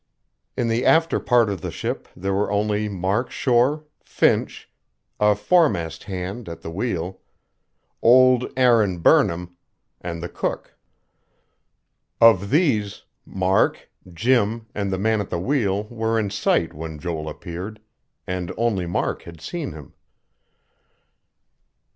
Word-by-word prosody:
In 120 - 0
the 115 +2 0
after 165 0 +3
part 120 -3 +3
of 100 -5 -3
the - - -4
ship - - -4
there 95 +2 -2
were 100 +1 0
only 105 +1 0
Mark 100 +5 -1
Shore, 130 +5 +1 0.2
Finch, - - 0 0.5
a 105 0 +4
foremast 105 - +1
hand 95 +2 -5
at 85 - -8
the 80 - -7
wheel, 95 -2 -3 0.8
old 125 +1 +5
Aaron 115 -8 +4
Burnham, 85 +1 +2 0.5
and 85 -1 -5
the - - -3
cook. - - -4 1.4
Of 105 -4 +5
these, 130 - +1 0.2
Mark, 95 0 0 0.2
Jim, 115 +3 +1
and 100 -1 -2
the 95 - -1
man 110 +2 +1
at 100 - -6
the - - -2
wheel 100 -1 0
were 115 0 -2
in 105 -3 -1
sight 100 - +1
when 80 0 -7
Joel 80 -1 -4
appeared; 90 +6 -7 0.5
and 90 -2 -4
only 110 -6 0
Mark 85 - -2
had 85 -1 -12
seen 150 - -5
him. 75 -3 -12
100 Hz, 130 wpm, -22 LUFS, 90-115 Hz, 1.4 s, old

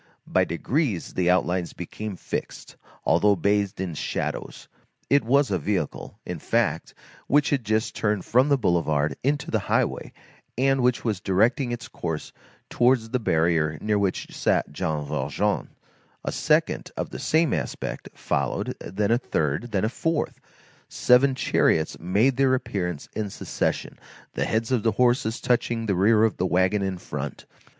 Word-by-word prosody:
By - - +2
degrees 110 - -1
the 90 -1 +1
outlines 90 -1 +1
became 100 +4 -6
fixed, - - -6 0.3
although 100 +6 +4
bathed 100 +2 0
in 95 -3 -3
shadows. 75 - -4 0.4
It 140 0 +5
was 135 +2 +3
a 95 - +1
vehicle, 90 -2 -3
in - - -5
fact, - - 0 0.3
which 145 +1 +3
had 140 -4 +1
just 110 +1 0
turned 105 -3 0
from 130 +5 +3
the 140 - +4
boulevard 80 - +1
into 145 +2 0
the - - +2
highway, - - 0 0.5
and 135 +1 +2
which 125 -1 +1
was 105 -5 0
directing 110 +7 +2
its 120 0 -5
course 80 -3 -5 0.3
towards 120 -2 +2
the 125 - +1
barrier 80 -6 +1
near 105 -1 +1
which 100 -2 -2
sat - - +1
Jean 75 0 -2
Valjean; 70 -2 -1 0.6
a - - -1
second, - - +1
of - - -3
the - - -6
same 160 -1 +2
aspect, - - -4
followed, 70 -3 -2
then 100 +3 -2
a 120 - +4
third, 80 - -1
then 100 0 +1
a - - +2
fourth; 165 +5 -2 0.5
seven 130 +2 +4
chariots 80 -9 +1
made 105 +10 +2
their 135 -1 +4
appearance 90 - -3
in 105 -2 -3
succession, - - -3 0.3
the - - -1
heads 110 +2 -1
of 125 -4 +2
the 115 0 +1
horses 120 -1 +2
touching 120 -2 0
the 100 - +1
rear 105 +4 +4
of 110 - +2
the 95 - 0
wagon 95 +3 +2
in 95 -1 -2
front. - - -6
105 Hz, 160 wpm, -25 LUFS, 90-125 Hz, 0.6 s, It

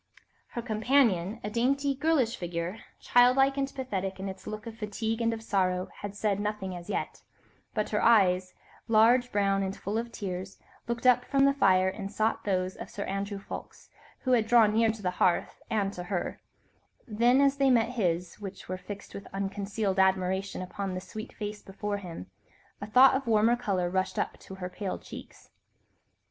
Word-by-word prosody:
Her 235 - -2
companion, 220 -4 +2
a 210 - -4
dainty, 275 +5 +1
girlish 275 -4 +1
figure, 175 +3 -4 0.2
childlike 255 +3 +4
and 275 0 -1
pathetic 195 -8 -4
in 195 - -4
its 190 0 -8
look 215 0 -6
of 230 -1 -7
fatigue 220 +1 -3
and 230 0 +2
of 225 -1 -5
sorrow, 185 -3 0
had 205 0 -6
said 205 -1 0
nothing 205 -3 -3
as 175 -1 -9
yet, - - -3 0.5
but 215 - 0
her 210 - +1
eyes, 185 -5 +4 0.3
large, 235 +3 +4
brown, 195 -1 +2
and 195 0 -3
full 210 +3 -2
of 235 0 -5
tears, 190 -3 -5 0.3
looked 235 +1 -3
up 250 -1 +6
from 275 +1 +3
the 275 - +4
fire 190 -8 +4
and 195 +1 -4
sought 220 +1 0
those 185 -2 0
of - - -8
Sir 200 - -5
Andrew 200 +1 -3
Ffoulkes, 195 - -9 0.3
who 255 - -1
had 230 -3 +3
drawn 225 -3 +5
near 225 +1 +4
to 220 -1 -4
the 180 - +1
hearth 175 - +1
and 205 -3 0
to 180 - -6
her; 180 -1 -3 0.7
then, 240 +4 +3
as 280 0 +3
they 275 -1 +3
met 235 -2 +4
his, 180 -7 -1
which 195 -1 -8
were 185 - -3
fixed 200 +1 -9
with 200 - -8
unconcealed 195 0 -2
admiration 190 0 +1
upon 190 +1 -4
the - - -2
sweet 215 +5 -8
face 210 -1 -6
before 205 +1 -4
him, 175 - -8 0.6
a 205 - -5
thought 255 +5 +7
of 265 -1 -1
warmer 225 +1 +4
colour 200 -7 -1
rushed 185 +1 -1
up - - -2
to 190 - -10
her 185 -1 -5
pale 185 +1 -4
cheeks. - - -12
210 Hz, 185 wpm, -29 LUFS, 190-235 Hz, 0.7 s, thought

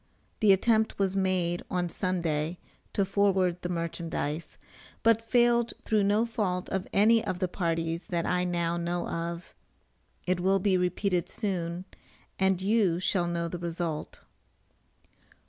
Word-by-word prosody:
The 215 -3 +5
attempt 220 +3 +3
was 195 -1 0
made 185 -3 0
on 180 -2 0
Sunday 170 -3 -1 0.4
to 200 - +2
forward 190 -3 +2
the 175 - -3
merchandize, 165 -2 -3 0.5
but 225 -1 +4
failed 235 0 +2
through 215 -2 +2
no 210 +3 +3
fault 200 -6 -2
of 190 -1 -2
any 220 +3 +4
of 180 - -2
the 185 0 0
parties 165 -1 -2
that 170 -2 -1
I 180 0 +1
now 170 -1 0
know 175 +1 -2
of. 170 +1 -4 0.7
It 185 0 +1
will 190 +2 +3
be 195 0 +2
repeated 180 0 0
soon, 180 -3 -3 0.5
and 190 -1 +3
you 200 -5 +2
shall 180 -1 +1
know 170 0 -1
the 175 +1 -5
result. 170 -2 -4
180 Hz, 140 wpm, -28 LUFS, 170-200 Hz, 0.7 s, The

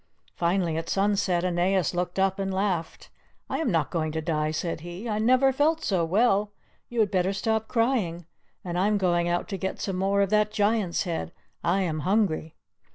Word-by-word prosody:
Finally 170 -2 0
at 165 0 -4
sunset 195 -3 +1
Aeneas 180 0 +1
looked 180 +1 -2
up 195 +1 +1
and 195 0 -1
laughed. 190 -4 -2 0.4
"I - - -1
am 320 - 0
not 165 -7 0
going 155 -2 -1
to 160 - -1
die," 155 -1 -1
said 165 +2 -3
he; 175 +7 -7
"I 215 -1 -1
never 255 +4 +4
felt 310 +4 +1
so 185 -4 +1
well; 205 +3 +2 0.4
you 240 -1 0
had 205 - +1
better 185 0 +1
stop 220 +2 -1
crying. 225 -9 0 0.4
And 175 0 -2
I 195 - +3
am 210 0 +2
going 175 -3 +1
out 175 0 -1
to 195 - -3
get 190 +1 -4
some 195 -2 -3
more 200 +1 +2
of 195 - -2
that 210 0 +3
Giant's 205 -4 +1
head; 170 -2 -3 0.3
I 175 +3 +2
am 160 -4 -1
hungry." 170 -2 0
190 Hz, 195 wpm, -26 LUFS, 175-210 Hz, 0.4 s, never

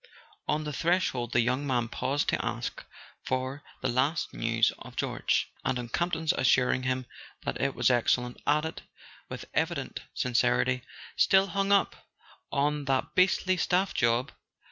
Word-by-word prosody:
On 150 +1 0
the 150 -1 -4
threshold 160 -8 0
the 120 - +4
young 125 +4 0
man 120 -3 +1
paused 130 +4 -1
to - - 0
ask 120 0 -4 0.4
for 130 +2 -2 0.2
the - - +2
last 135 +6 0
news 115 0 +2
of - - -11
George; - - 0
and 130 - 0
on 120 -1 -5
Campton's 165 +2 0
assuring 130 0 +3
him 130 0 -1 0.4
that - - -3
it 140 -1 0
was - - +3
excellent, 125 0 +1
added, 150 +2 +1 0.5
with - - -6
evident - - -1 0.2
sin¬ 125 - -1
cerity: 125 +1 +2 0.4
"Still 195 0 +4
hung 195 +3 0
up 200 -1 +2 0.4
on 145 +1 0
that 135 -1 0
beastly 185 0 +3
staff 185 +2 +1
job? 115 +3 +1
130 Hz, 150 wpm, -29 LUFS, 125-160 Hz, 0.5 s, the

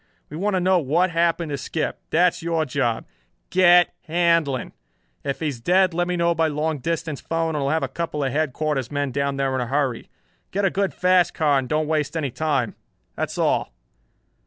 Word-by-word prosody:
We - - -6
want 200 +3 0
to - - +2
know 185 0 +3
what 170 +5 +1
happened 170 -1 +1
to 140 - -3
Skip. 155 +4 -3
That 175 +2 +4
is - - -10
your 165 -1 0
job. 125 -4 -1 0.5
Get 175 -1 +5
Handlon! 165 -6 +1 0.5
If 140 +2 -3
he 160 - 0
is 125 -5 -7
dead 185 +5 +3
let 175 +1 0
me 180 0 -1
know 170 0 +2
by 165 -1 +1
long 155 0 -1
distance 160 0 -3
phone 165 0 -1
and 155 - -2
I'll 140 -1 0
have 160 0 +1
a - - 0
couple 150 +1 -3
of 135 - -1
headquarters 150 -2 -1
men 145 -2 -2
down 140 +1 -1
there 135 -1 0
in 130 - 0
a 120 - -2
hurry. 135 -2 -1 0.4
Get 200 +1 0
a 190 - +2
good 195 0 -1
fast 180 -2 +3
car 145 -3 +3
and 130 -2 -5
don't 155 0 +1
waste 155 +1 -1
any 145 -5 -2
time. 140 -5 -1 0.4
That's - - -3
all." - - +1
155 Hz, 205 wpm, -23 LUFS, 140-170 Hz, 0.5 s, Get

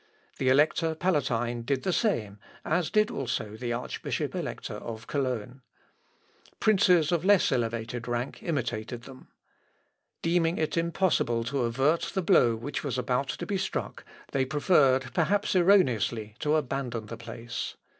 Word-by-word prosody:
The 130 - +2
Elector 160 +4 +3
Palatine 125 -9 0
did 130 +2 -1
the 185 - 0
same, 110 - 0 0.3
as 165 +1 +1
did 215 0 +2
also 110 -5 -3
the 120 +1 -4
Archbishop 120 +1 -3
Elector - - -4
of 115 -1 -7
Cologne. 130 -4 -3 1.0
Princes 180 -7 +4
of 170 -2 +1
less 200 -4 +4
elevated 115 -1 -2
rank 120 +2 -3
imitated 120 -6 -3
them. 130 0 -13 1.0
Deeming 165 0 +2
it 155 - -1
impossible 165 -8 +1
to 125 +1 -1
avert 135 +8 +1
the 190 - 0
blow 125 - +4
which 110 - -5
was - - -2
about - - 0
to - - -4
be - - -1
struck, - - -4 0.3
they 135 - +1
preferred, 135 -3 +3
perhaps 200 +5 +1
erroneously, 125 - +3
to 150 0 +1
abandon 130 -6 -2
the 115 - -7
place. 115 +1 -6
135 Hz, 140 wpm, -28 LUFS, 120-165 Hz, 1.0 s, Princes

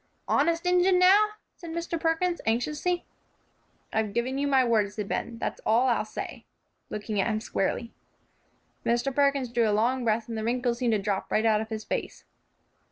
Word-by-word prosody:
"Honest 335 +4 +2
Injun, 360 +1 +4
now?" 405 +4 +5 0.2
said 340 - -10
Mr. 335 0 -3
Perkins, 340 +2 0
anxiously. 300 +10 0 0.9
"I've 215 -2 -1
given 255 +3 -1
you 285 - 0
my 265 -2 +4
word," 215 -4 +2
said 210 -1 -5
Ben; 230 - -3
"that's - - -4
all 240 +4 +3
I'll 230 -3 +1
say," 215 - -7 0.5
looking 210 -1 -2
at - - 0
him 215 -2 0
squarely. 225 +2 -2 0.9
Mr. 240 +3 0
Perkins 280 -3 +2
drew 235 -2 +2
a 210 0 +2
long 250 +3 +1
breath, 225 -1 0
and 230 - -5
the 220 - -3
wrinkles 240 +1 0
seemed 240 -3 +1
to - - +3
drop 195 -1 -2
right 220 - +2
out 215 -1 +3
of 220 - -6
his 220 -1 -4
face. - - -4
240 Hz, 180 wpm, -27 LUFS, 220-305 Hz, 0.9 s, now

